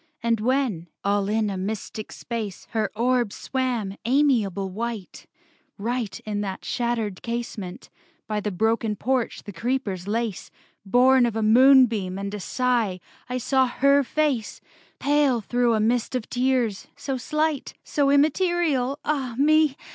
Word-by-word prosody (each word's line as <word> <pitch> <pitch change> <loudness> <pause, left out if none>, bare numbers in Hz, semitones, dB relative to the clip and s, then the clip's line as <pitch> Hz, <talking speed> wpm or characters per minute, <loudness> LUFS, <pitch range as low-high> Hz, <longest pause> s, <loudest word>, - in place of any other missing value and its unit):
And 230 -1 +2
when, 235 -8 0 0.2
all 200 0 +1
in 215 -1 +1
a 195 - -4
mystic 210 +2 -5
space, 220 -5 -5
Her 220 -1 0
orb 240 -1 +1
swam, 240 -8 -2
amiable 230 -7 +2
white, 225 -1 -5 0.5
Right 220 -2 -3
in 205 -1 -3
that 195 -2 -5
shattered 230 -5 -2
casement, 230 -6 -5 0.3
by 215 -1 -2
The 210 - -2
broken 220 +2 0
porch 250 +3 -1
the 205 - -9
creepers 200 -3 -2
lace, 220 -2 -2 0.4
Born 250 +3 +5
of 230 - -4
a 225 - 0
moonbeam 230 -5 +5
and 200 +1 -4
a 210 - -4
sigh, 235 -4 0 0.3
I 250 - -1
saw 260 +1 +2
her 280 +3 +3
face, 270 -4 -1 0.4
Pale 285 -4 +2
through 240 +2 +1
a - - +1
mist 235 +3 +1
of 245 -3 -2
tears; 245 -5 0
so 270 -2 -3
slight, 305 +2 -1
So 285 -2 +1
immaterial, 295 -2 +2
ah 270 -6 -1
me! 305 0 +4
235 Hz, 140 wpm, -24 LUFS, 210-265 Hz, 0.5 s, Born